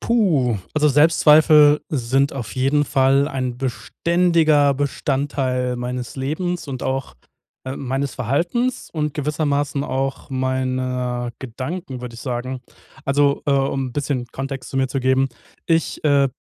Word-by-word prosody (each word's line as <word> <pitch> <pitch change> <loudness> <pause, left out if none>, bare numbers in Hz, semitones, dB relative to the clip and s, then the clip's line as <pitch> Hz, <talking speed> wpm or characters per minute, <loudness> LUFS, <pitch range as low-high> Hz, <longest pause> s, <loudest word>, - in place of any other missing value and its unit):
Puh. 155 - +2 0.2
Also 150 0 +3
Selbstzweifel 150 0 +6
sind 135 0 +1
auf 120 -7 -6
jeden 135 +3 +2
Fall 135 +1 +3
ein 130 -3 -3
beständiger 155 +2 +2
Bestandteil 130 -2 -1
meines 125 +1 -5
Lebens 160 +5 -3
und 130 -2 -5
auch 135 0 -3 0.5
äh, 130 +1 -5
meines 135 +1 -3
Verhaltens 175 - -1
und 150 -2 -2
gewissermaßen 145 -1 -1
auch 135 +1 -3
meiner 130 -2 -1
Gedanken, 130 +3 -6
würde 125 -1 -7
ich 115 - -10
sagen. 130 0 -4 0.4
Also, 140 +1 +2
äh, - - +2
um 135 -1 0
'n - - -11
bisschen 135 -3 -2
Kontext 135 +1 -6
zu 135 - -5
mir 135 - +2
zu 135 +1 -2
geben: 130 +1 +2 0.4
Ich, 165 -1 0
äh, 140 -2 +4
135 Hz, 135 wpm, -21 LUFS, 130-150 Hz, 0.5 s, Selbstzweifel